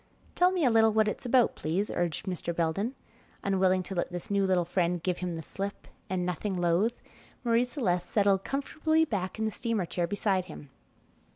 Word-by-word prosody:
"Tell 360 0 +4
me 360 -5 +1
a 250 - +4
little 225 -1 +5
what 215 0 +3
it's 230 +4 -3
about, 245 -1 +4
please," 180 +7 -1
urged 175 -1 -1
Mr. 180 -2 -3
Belden, 185 +10 -1 0.5
unwilling 190 -1 +2
to 190 - -6
let 175 0 -2
this 175 +4 -5
new 200 -1 +2
little 180 -2 +2
friend 175 -1 0
give 180 -1 -1
him 180 -1 -3
the 160 - -6
slip, 200 +4 -6 0.2
and 180 -1 -1
nothing 180 +2 -2
loath, 175 +7 +1 0.4
Marie 235 0 +3
Celeste 185 - -1
settled 200 -2 +3
comfortably 315 +3 +1
back 195 -8 -3
in 220 - -1
the 220 - 0
steamer 225 -2 -1
chair 170 0 -2
beside 195 -1 0
him. 150 -5 -11
195 Hz, 190 wpm, -29 LUFS, 175-225 Hz, 0.5 s, little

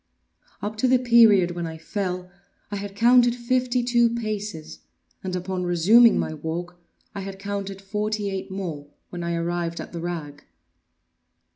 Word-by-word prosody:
Up 210 +1 -4
to 255 - +2
the 255 0 +5
period 230 -7 +5
when 175 -1 -4
I 160 0 -7
fell 180 +1 -4 0.4
I 205 - -2
had 200 0 -6
counted 240 +2 +5
fifty 250 0 0
two 240 -1 +3
paces, 210 -8 -5 0.4
and 185 -1 -3
upon 185 0 -3
resuming 195 +7 +5
my - - -1
walk, 175 +3 -5 0.3
I 200 - -5
had 195 0 -6
counted 195 0 -5
forty 210 0 -2
eight 195 +1 -5
more—when 175 -2 -7
I 170 0 -1
arrived 170 0 -2
at - - -7
the 170 - -5
rag. 160 -4 -5
195 Hz, 150 wpm, -24 LUFS, 175-220 Hz, 0.4 s, the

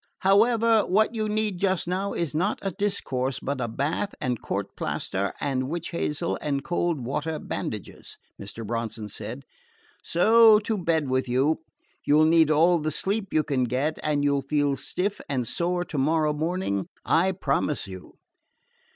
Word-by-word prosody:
"However, 225 +3 +4
what 215 +4 +2
you 215 -2 -1
need 210 -3 0
just 185 -3 +1
now 190 +3 -1
is 170 -3 -2
not 185 +7 0
a 195 - -1
discourse, 135 -9 -2
but 140 +1 -3
a - - -1
bath 145 - -2
and 125 -2 -2
court - - -4
plaster 100 +1 -2
and 130 -2 -1
witch 170 +1 -3
hazel 170 0 -2
and 140 -2 -1
cold 175 -4 -1
water 150 +4 -2
bandages," - - -6 0.2
Mr. 105 +3 -7
Bronson 115 -1 -4
said; 70 - -7 0.6
"so 220 +5 +6
to 220 +1 -1
bed 165 -4 +1
with 130 -1 0
you. 135 +6 +2 0.4
You 145 - +4
'll 155 - +6
need 160 -1 +5
all 165 +3 +4
the 155 0 -1
sleep 200 +7 -1
you 155 - +2
can 130 -4 0
get, 130 +6 -1
and 150 -1 0
you 140 0 +2
'll - - -1
feel 145 0 +1
stiff 180 +9 -3
and 130 -4 -1
sore 175 +7 0
to 155 -5 -4
morrow 155 +2 +2
morning, 155 - -2 0.2
I 180 +4 +3
promise 150 -4 -1
you." 95 -2 -10
155 Hz, 170 wpm, -26 LUFS, 135-185 Hz, 0.6 s, so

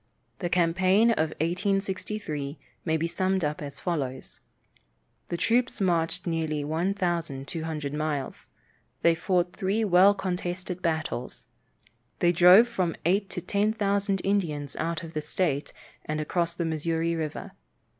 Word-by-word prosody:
The 175 - -2
campaign 185 +6 +3
of 160 -8 +1
1863 185 -4 -2 0.3
may 160 -1 +2
be 160 - -1
summed 185 +1 0
up 150 0 -3
as 140 -1 -7
follows: 135 -7 -3 0.9
The 170 - -2
troops 245 +6 +1
marched 170 -4 0
nearly 160 -3 -1
1,200 160 -3 -2
miles. 150 -2 -3 0.6
They 170 - +6
fought 175 +1 0
three 200 +3 0
well 195 0 +6
contested 180 -1 -3
battles. 160 -7 -3 0.7
They 175 - +3
drove 180 +7 +7
from 185 -8 -1
eight 195 +3 +2
to 180 - -4
ten 205 +4 +1
thousand 200 -2 0
Indians 160 -8 -1
out 165 -1 -2
of 165 0 -8
the 155 - -2
state, 150 -2 -1 0.3
and 155 0 -3
across 170 +2 -1
the 170 - -2
Missouri 165 +1 -1
river. 155 -2 -4
170 Hz, 130 wpm, -27 LUFS, 155-190 Hz, 0.9 s, drove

